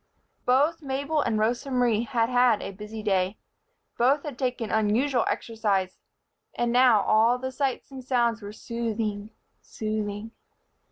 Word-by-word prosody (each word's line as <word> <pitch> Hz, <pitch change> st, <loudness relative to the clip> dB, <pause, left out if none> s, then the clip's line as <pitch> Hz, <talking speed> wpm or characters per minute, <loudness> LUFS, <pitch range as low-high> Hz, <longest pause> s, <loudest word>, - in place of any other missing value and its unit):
Both 290 Hz, +7 st, +3 dB
Mabel 280 Hz, +2 st, -1 dB
and 230 Hz, -5 st, 0 dB
Rosa 235 Hz, +5 st, 0 dB
Marie 240 Hz, -3 st, +1 dB
had 235 Hz, -3 st, +1 dB
had 245 Hz, -2 st, +3 dB
a -, -, -5 dB
busy 210 Hz, +2 st, -8 dB
day. 195 Hz, -1 st, 0 dB, 0.6 s
Both 270 Hz, +5 st, +3 dB
had 285 Hz, -5 st, -7 dB
taken 250 Hz, -4 st, -2 dB
unusual 230 Hz, +4 st, +2 dB
exercise. 200 Hz, -5 st, -1 dB, 0.6 s
And 240 Hz, 0 st, 0 dB
now 245 Hz, -3 st, +5 dB
all 225 Hz, +3 st, +4 dB
the 260 Hz, +1 st, -4 dB
sights 270 Hz, 0 st, -2 dB
and 265 Hz, -1 st, -8 dB
sounds 235 Hz, -3 st, +1 dB
were 205 Hz, 0 st, -7 dB
soothing, 220 Hz, -2 st, -3 dB, 0.3 s
soothing. 215 Hz, 0 st, -4 dB
235 Hz, 135 wpm, -26 LUFS, 215-255 Hz, 0.6 s, now